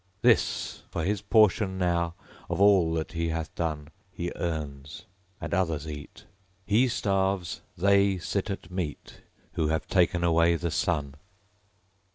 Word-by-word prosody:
This, - - +2
for 85 - -3
his 100 +2 0
portion 105 -2 +3
now, 85 -2 0 0.3
of - - -2
all 100 -5 +5
that 80 -1 -3
he 85 -1 -1
hath 80 0 -3
done. 75 -3 -3 0.2
He 85 0 -4
earns; 75 -4 -5 0.3
and - - -5
others 80 -5 0
eat. 75 -1 -9 0.4
He 115 +5 +3
starves; 95 -6 -1 0.2
they 100 +1 +4
sit 100 +3 -2
at 95 -3 -6
meat 90 -5 -5 0.3
Who 80 -3 0
have 80 +1 -1
taken 90 -2 +2
away 85 0 +4
the 85 0 -2
Sun. 75 -9 -1
85 Hz, 140 wpm, -27 LUFS, 80-95 Hz, 0.4 s, all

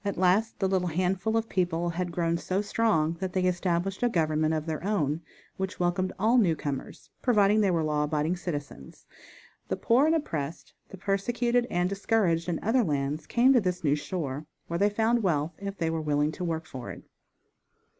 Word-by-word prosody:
At 200 -1 -2
last 190 +5 +2
the 195 - +1
little 185 -1 +1
handful 185 +6 0
of 225 0 -1
people 175 -3 0
had 175 +1 -3
grown 170 -1 0
so 185 +2 -1
strong 200 -7 +1
that 185 -1 -3
they 185 - +1
established 180 +1 0
a 245 - +3
government 155 -4 +1
of 155 -1 -2
their 160 -1 -4
own, 165 -7 0 0.4
which 190 +1 -4
welcomed 180 +1 0
all 225 +5 +4
newcomers, 155 - -2
providing 210 -3 +4
they 200 - +3
were 170 -3 +1
law 150 -1 +1
abiding 155 +3 0
citizens. 145 - -7 0.6
The - - -2
poor 255 +6 +3
and 320 - +3
oppressed, 160 - -4 0.2
the 195 - -10
persecuted 240 +6 0
and 175 +1 +1
discouraged 195 -4 +1
in 170 - 0
other 235 +4 +3
lands 150 -2 -2
came 250 +3 +4
to 245 - +5
this 180 -2 -2
new 145 -2 +3
shore, 150 -3 -4 0.2
where 170 0 -3
they 205 +1 +4
found 225 +3 +1
wealth 160 -4 0
if 200 0 -5
they 165 -1 0
were 165 -1 -2
willing 150 0 +1
to 180 - -6
work 165 -2 -2
for 130 -5 -8
it. - - -9
180 Hz, 190 wpm, -28 LUFS, 160-205 Hz, 0.6 s, to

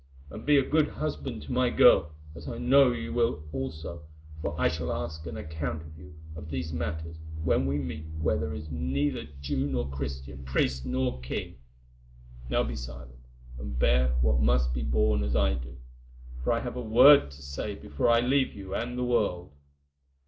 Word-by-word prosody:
And 110 - -9
be 145 -1 +6
a 135 - +4
good 155 -1 +3
husband 140 - -4
to 70 - -8
my - - +2
girl, 75 0 +5 0.2
as 80 -2 -10
I - - -5
know 135 +1 +5
you 75 -10 -4
will 115 -8 +1
also, 75 +5 -5 0.4
for 75 0 -3
I - - +4
shall 80 +1 -2
ask 80 -1 -4
an 80 -2 -6
account 80 0 -4
of 80 0 -12
you 75 0 -13 0.2
of 75 0 -8
these 80 +2 -3
matters 80 0 -4 0.3
when 80 -4 +2
we 70 +1 0
meet 75 0 -5
where 80 - +2
there 75 -1 -3
is 75 +1 -7
neither 75 -1 -1 0.2
Jew 70 0 -1
nor 65 -1 -1
Christian, 65 -1 -6
priest 65 0 0
nor 130 - -1
king. 60 0 -5 0.9
Now - - +2
be - - -4
silent, - - -9 0.4
and 65 -1 -5
bear 65 +1 +3
what 60 0 +3
must 60 0 +2
be 60 - -2
borne 70 +3 +2
as 70 -2 -1
I - - +3
do, - - -6 0.7
for - - +1
I 115 0 +1
have 125 0 -5
a - - -2
word 125 - +7
to 70 +1 -13
say 70 0 -4
before 75 +10 -1
I 115 0 +5
leave 130 +2 +2
you 95 -1 -7
and 120 +2 -3
the 125 - 0
world. 100 -9 0
75 Hz, 190 wpm, -28 LUFS, 65-90 Hz, 0.9 s, word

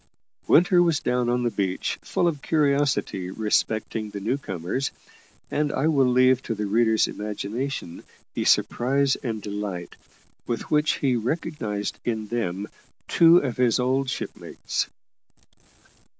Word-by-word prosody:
Winter 175 +2 +5
was 170 -4 +2
down 125 -1 0
on 125 0 +1
the 120 - 0
beach 95 -3 -2
full 175 - 0
of 150 -5 -2
curiosity 140 - +1
respecting 110 +1 -1
the 100 - -6
new 110 +6 0
comers, 100 +1 -3 0.6
and 150 0 0
I 135 - 0
will 135 -4 +3
leave 130 0 +4
to 115 - -3
the 105 - -3
reader's 110 +1 +3
imagination 105 0 -4 0.3
the - - -2
surprise 135 +2 +2
and 110 -5 -4
delight 100 -4 -5 0.5
with 120 - -4
which 150 0 +3
he 130 -3 +1
recognised 115 -5 -3
in 110 -2 -2
them 100 -4 -2 0.4
two 170 0 +6
of 125 - -3
his 125 -1 +3
old 130 +2 +1
shipmates. - - -4
120 Hz, 135 wpm, -25 LUFS, 105-140 Hz, 0.6 s, two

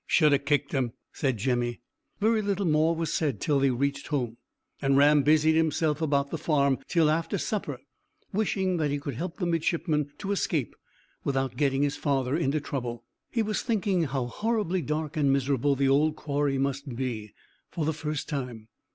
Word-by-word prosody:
"Should 150 -4 +4
ha' 140 0 +2
kicked 145 0 +1
him," 125 -4 0 0.2
said 135 -5 0
Jemmy. 120 +1 -1 0.4
Very 220 +1 +3
little 200 -1 -1
more 160 +1 +3
was 165 -1 -2
said 140 -10 0
till 145 -2 +1
they 135 0 +3
reached 140 +3 -1
home, 125 -6 -2 0.4
and 135 0 +3
Ram 145 +1 +6
busied 155 +2 +4
himself 160 -1 +1
about 140 -2 +1
the 165 - -3
farm 140 -4 +2
till 165 -3 +3
after 160 +2 0
supper, - - -2 0.6
wishing 190 -3 0
that 155 -3 +1
he 145 - 0
could 140 -1 -5
help 165 +8 -5
the 180 - -1
midshipman 160 -3 0
to 200 -1 -4
escape 160 - -1 0.5
without 135 -2 -1
getting 135 +1 +1
his 145 0 0
father 135 -2 0
into 155 -2 +1
trouble. 125 -5 -4 0.3
He 230 - 0
was 215 0 -1
thinking 200 -7 +1
how 135 -3 -2
horribly 205 - -1
dark 150 +2 -3
and 140 -2 +3
miserable 140 0 +2
the 135 0 +2
old 150 +3 +3
quarry 145 -2 -1
must 135 -1 -2
be, 115 -5 -4 0.3
for 160 - -2
the 160 - +1
first 150 -1 -4
time. 125 -7 -5
145 Hz, 180 wpm, -27 LUFS, 135-160 Hz, 0.6 s, Ram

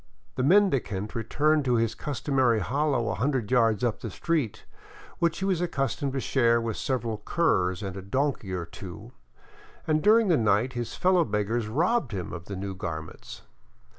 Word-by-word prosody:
The - - -2
mendicant 130 - +2
returned 145 +7 +1
to 125 -1 +2
his 115 -1 +1
customary 130 -3 0
hollow 130 +1 0
a - - 0
hundred 130 -3 -1
yards 115 -4 +3
up 120 -3 0
the 115 - -5
street, 145 - -2 0.5
which 170 -1 +1
he 190 - -2
was 185 -3 +1
accustomed 140 -4 -1
to 135 - -1
share 120 -3 +2
with 115 -2 -3
several 120 -5 -2
curs 95 - +1
and 95 -1 -5
a 95 - -6
donkey 125 0 -1
or 90 -2 -3
two, 100 +7 -10 0.7
and 155 -1 +1
during 220 +3 +5
the 170 -4 +4
night 110 +3 +2
his 120 -2 -4
fellow 185 -1 +3
beggars 105 -2 -1
robbed 155 - +1
him 90 -3 -4
of 85 -1 -7
the 100 - -6
new 95 +1 -4
garments. 85 -4 -7
120 Hz, 170 wpm, -27 LUFS, 105-150 Hz, 0.7 s, during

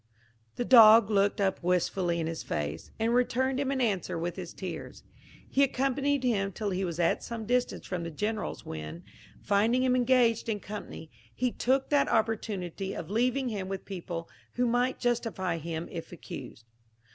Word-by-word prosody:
The 245 - -2
dog 225 -3 +8
looked 200 0 +2
up 195 -1 +1
wistfully 180 0 +1
in 165 - -1
his 165 0 -4
face, 75 +2 -4
and 225 +1 +1
returned 260 +2 +1
him 280 -1 0
an 275 -1 0
answer 205 -10 0
with 170 +1 -3
his 180 -3 -6
tears. 185 -3 -7 0.4
He 275 - +1
accompanied 275 +1 +1
him 200 -6 +1
till 205 +1 -3
he 185 +1 -1
was 170 -2 -3
at 170 - +2
some 230 -2 -5
distance 250 +2 0
from 180 -2 -3
the 170 - -4
General's, 210 +7 -3
when, 80 +2 -7 0.4
finding 220 +5 +2
him 255 -1 +3
engaged 245 -2 +3
in 210 -2 -1
company, 200 -6 -8 0.2
he 250 0 0
took 265 +3 +1
that 285 -1 +3
opportunity 205 -4 -1
of 170 - -6
leaving 250 +4 +1
him 200 -4 -4
with 195 -1 -5
people 170 -3 -5 0.3
who 245 - +1
might 245 +2 +1
justify 225 -8 -1
him 165 +1 -4
if 165 - -7
accused. 130 -8 -9
210 Hz, 170 wpm, -29 LUFS, 175-245 Hz, 0.4 s, dog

